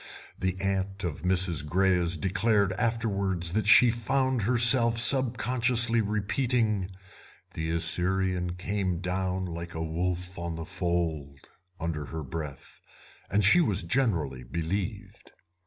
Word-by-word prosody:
The 95 0 -2
aunt 95 0 -2
of 80 -4 -4
Mrs. 90 -4 +2
Greyes 90 +1 +1
declared 100 +1 +1
afterwards 100 -6 -1
that 105 0 0
she 120 +2 +7
found 130 +2 -1
herself 120 +1 +5
sub 125 +1 +3
consciously 120 -2 +2
repeating 110 -1 -1 0.6
"The 80 0 -4
Assyrian 90 +2 0
came 95 -1 -2
down 95 +1 -2
like 85 -1 -7
a 80 - -3
wolf 90 +2 -3
on 85 -1 -4
the 80 0 -6
fold" 80 -6 -3 0.4
under 80 -3 -4
her 80 +2 -6
breath, 75 0 -8 0.5
and 100 +1 +1
she 170 - +5
was 105 - +1
generally 85 - -1
believed. 85 +9 -5
95 Hz, 125 wpm, -27 LUFS, 85-110 Hz, 0.6 s, she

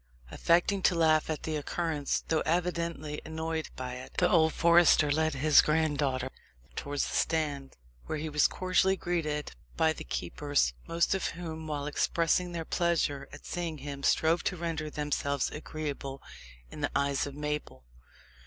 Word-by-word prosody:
Affecting 175 +4 +2
to 180 - +3
laugh 160 -2 +3
at 155 -2 -3
the 155 - -2
occurrence, 150 -1 -1
though 160 -1 +1
evidently 170 -3 -1
annoyed 160 0 -3
by 125 -1 -5
it, 130 - -11
the 180 - +4
old 160 -2 +4
forester 170 -3 +5
led 155 0 +1
his 150 +2 +6
granddaughter 145 -4 0 0.4
towards 145 0 -2
the - - -6
stand, 145 -4 -1 0.3
where 155 - -2
he 155 +1 -3
was 150 -1 +3
cordially 185 +1 +2
greeted 155 -5 -2 0.3
by 160 -1 +3
the - - -8
keepers, 145 - 0
most 170 0 +1
of 190 - 0
whom, 160 -2 -6
while 145 -2 -3
expressing 165 +4 +1
their 165 -2 -4
pleasure 155 -6 0
at 145 - -12
seeing 170 -3 -3
him, 140 0 -7
strove 160 +4 +3
to 180 - -1
render 160 -2 -3
themselves 145 -2 -1
agreeable 145 -3 -5 0.5
in - - -8
the - - +1
eyes 140 0 +1
of 140 - -8
Mabel. 150 - -4
155 Hz, 155 wpm, -30 LUFS, 145-170 Hz, 0.5 s, his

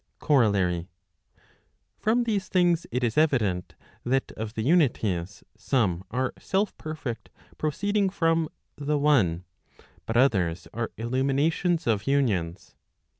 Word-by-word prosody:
COROLLARY. 100 - +2 1.1
From 235 +3 +2
these 205 -5 -1
things 175 -2 +2
it 125 +2 -2
is 120 +4 +2
evident, 110 - +1 0.3
that 130 +2 0
of 110 +1 -6
the 110 - -2
unities, 110 - +1
some 105 -6 0
are 130 +3 -1
self 200 +1 -1
perfect 130 -9 -6 0.3
proceeding 200 +6 0
from 165 -3 +1 0.3
the 145 +1 -1
one, 115 - +2 0.6
but 115 - 0
others 95 -10 +2
are 115 0 -2
illuminations 140 +8 0
of 110 -1 0
unions. 100 -11 0
130 Hz, 115 wpm, -26 LUFS, 105-160 Hz, 1.1 s, COROLLARY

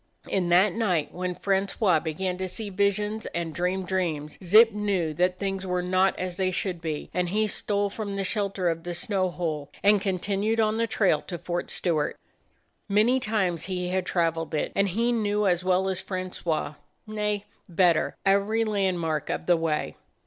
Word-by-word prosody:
In 185 -3 0
that 180 +2 +5
night 185 -9 0
when 180 0 -3
Francois 195 -2 +1
began 170 +4 -2
to 190 - -2
see 205 +3 -5
visions 205 +2 0
and 170 -2 -2
dream 180 +4 -1
dreams, 165 -5 -2
Zip 220 +6 +7
knew 200 -6 -1
that 180 +3 +1
things 195 -1 -3
were 180 -1 -1
not 185 +1 +2
as 180 -1 -4
they 190 -1 +1
should 185 -1 -2
be, 155 -3 -4
and 180 -1 0
he 215 +4 +1
stole 205 -1 -1
from 205 -2 -4
the 195 - -1
shelter 195 -2 -1
of 165 -1 -1
the 175 0 -4
snow 190 0 0
hole 160 -5 -3
and 205 0 +5
continued 200 +3 0
on 215 0 +2
the 230 0 +1
trail 195 -8 +2
to 175 - -4
Fort 175 +1 -3
Stewart. 160 -5 0 0.7
Many 220 +6 +4
times 195 -8 0
he 180 -2 -2
had 185 0 -1
traveled 165 -2 0
it, 150 - -1
and 200 0 +2
he 230 +6 +1
knew 210 -2 +1
as 180 -2 +2
well 185 +1 +2
as 190 -1 -2
Francois, 185 -5 -3 0.3
nay, 210 -1 -2 0.2
better, 175 -2 +2
every 200 +3 +3
landmark 180 -7 -1
of - - -2
the 175 - +4
way. 155 - -1
185 Hz, 180 wpm, -26 LUFS, 175-205 Hz, 0.7 s, Zip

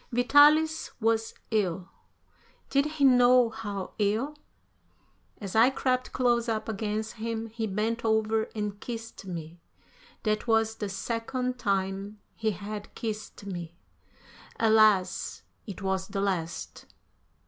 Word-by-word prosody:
Vitalis 295 +6 +5
was 225 0 +1 0.2
ill. 190 -4 0 0.8
Did 280 +1 +3
he 305 -2 -2
know 250 -2 +6
how 205 -4 -5
ill? 215 +8 +1 1.1
As 200 -2 -6
I 230 +3 +7
crept 255 -1 -1
close 240 -2 +1
up 220 -1 -2
against 215 0 -2
him, 225 0 -3
he 225 0 -3
bent 220 +4 -1
over 220 0 +1
and 210 -1 -3
kissed 225 -4 -7
me. 170 -1 -7 0.6
That 215 +1 0
was 225 -1 +3
the 205 - -3
second 245 +5 -3
time 195 -1 -1 0.2
he 220 - 0
had 205 +1 -6
kissed 215 -3 -5
me. 175 -4 -6 0.8
Alas! 215 -4 +3 0.2
it 200 -1 -7
was 190 0 -1
the 200 - -4
last. 180 -4 -3
220 Hz, 120 wpm, -28 LUFS, 200-235 Hz, 1.1 s, I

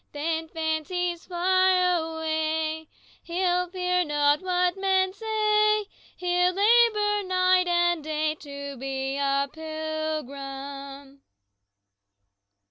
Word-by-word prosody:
Then, 320 +2 -2
fancies 330 +2 -2
fly 370 +1 +2
away, 320 -3 0 0.3
He'll 360 0 0
fear 360 0 0
not 295 -1 +2
what 360 -1 +1
men 380 -1 +1
say; 425 0 +1 0.3
He'll 360 0 +1
labor 420 0 +4
night 365 0 +3
and 345 -2 +2
day 310 0 -1
To 280 -2 -8
be 270 +1 -3
a 275 0 +1
pilgrim." 280 -3 -6
330 Hz, 90 wpm, -26 LUFS, 300-370 Hz, 0.3 s, labor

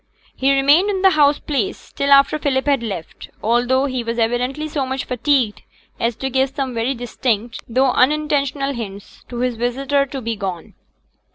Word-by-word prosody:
He 270 +1 +2
remained 285 +8 +4
in 385 -2 -1
the 385 - +7
house 290 -3 +4
place, 315 +7 -3
till 280 - -1
after 275 +2 +5
Philip 265 -3 0
had 280 -4 +2
left, 195 -8 -7
although 245 +4 +2
he 255 -3 -2
was 230 0 -3
evidently 250 +6 -1
so 290 -2 -2
much 265 0 -3
fatigued 250 -3 0 0.4
as 230 0 0
to 265 +4 -4
give 265 +1 +2
some 270 -1 -3
very 235 +4 -1
distinct, 240 -1 -2
though 260 +2 +3
unintentional, 280 0 +1
hints 200 -5 -8
to 240 -1 -4
his 250 -2 -1
visitor 275 +4 0
to 270 0 -5
be 230 -2 -3
gone. 190 -5 -5
265 Hz, 175 wpm, -20 LUFS, 235-280 Hz, 0.4 s, the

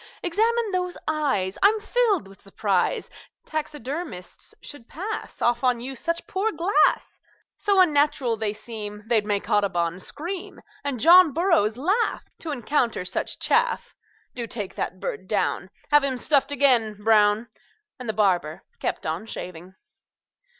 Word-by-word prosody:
"Examine 445 +5 +1
those 360 -1 -2
eyes. 275 -12 0
I'm 425 +3 +5
filled 430 - +1
with 195 0 -16
surprise 195 -1 0 0.4
Taxidermists 300 - -6
should 290 -5 -11
pass 410 +7 -5
Off 240 +1 +2
on 250 -2 +2
you 265 +3 -6
such 335 +6 -3
poor 410 +4 -1
glass; 345 +4 +1 0.4
So 400 -2 +3
unnatural 290 -7 +3
they 215 -1 -1
seem 210 -1 -7
They'd 220 -2 +2
make 205 -1 -1
Audubon 180 -4 +1
scream, 345 - -6 0.2
And 280 -4 -2
John 340 +2 +7
Burroughs 330 - +2
laugh 390 - 0
To 330 - -6
encounter 245 -6 0
such - - -3
chaff. 480 +1 +1 0.4
Do 235 -2 -4
take 210 -4 -4
that - - -4
bird - - -5
down; - - -1 0.2
Have 295 -1 +6
him 265 -2 0
stuffed 285 +2 +2
again, 245 -6 +3
Brown!" 210 +1 +3 0.5
And 250 -3 -6
the - - 0
barber 180 -7 +1 0.2
kept - - -3
on 165 +7 -3
shaving. 180 -2 -8
260 Hz, 140 wpm, -24 LUFS, 210-350 Hz, 0.5 s, John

